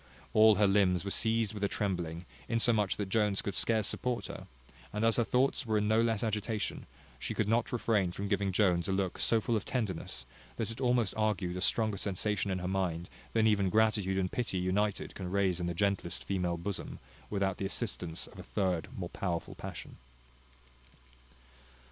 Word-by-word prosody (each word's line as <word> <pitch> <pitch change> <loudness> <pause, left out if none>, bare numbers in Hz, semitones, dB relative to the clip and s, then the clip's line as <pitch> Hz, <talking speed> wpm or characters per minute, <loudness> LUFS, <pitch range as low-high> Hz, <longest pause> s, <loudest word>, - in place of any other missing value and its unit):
All 110 0 +7
her 105 +1 +4
limbs 95 -2 +3
were 100 - -1
seized 110 -1 +2
with 105 -1 -5
a - - +4
trembling, 90 -5 -2 0.2
insomuch 115 -4 +2
that 100 - -2
Jones 105 0 +1
could 100 - -2
scarce 110 0 +2
support 125 +3 -2
her; - - -8 0.4
and 105 +2 0
as 115 - +3
her 120 - +4
thoughts 130 +5 +2
were 110 -3 +1
in 105 0 +1
no 110 +1 +4
less 115 -2 +1
agitation, 110 -1 -2 0.3
she - - -3
could 110 - +1
not 115 +2 +1
refrain 110 -6 +1
from 100 +3 -4
giving 100 -1 +1
Jones 90 -3 +2
a - - 0
look 95 -2 -1
so 115 - +3
full 115 +2 0
of 105 - 0
tenderness, 100 - -3 0.3
that - - -2
it 115 +3 -8
almost 120 -5 +2
argued 105 -5 0
a 90 - -3
stronger 110 +1 +1
sensation 100 +1 -1
in 95 - 0
her 90 0 -3
mind, 90 -3 -1 0.2
than 110 -1 +3
even 100 -3 +3
gratitude 105 -3 +2
and 90 -1 0
pity 120 -6 -2
united 95 +3 0
can 95 -2 -5
raise 95 -2 +1
in 90 - -1
the 85 - -2
gentlest 100 -2 -1
female 90 -3 -1
bosom, 95 +3 -4 0.3
without 100 -2 0
the 95 - -2
assistance 90 -6 -2
of - - -13
a - - -7
third 90 -5 -1
more - - -4
powerful 85 -3 -3
passion. - - -8
100 Hz, 190 wpm, -32 LUFS, 95-110 Hz, 0.4 s, All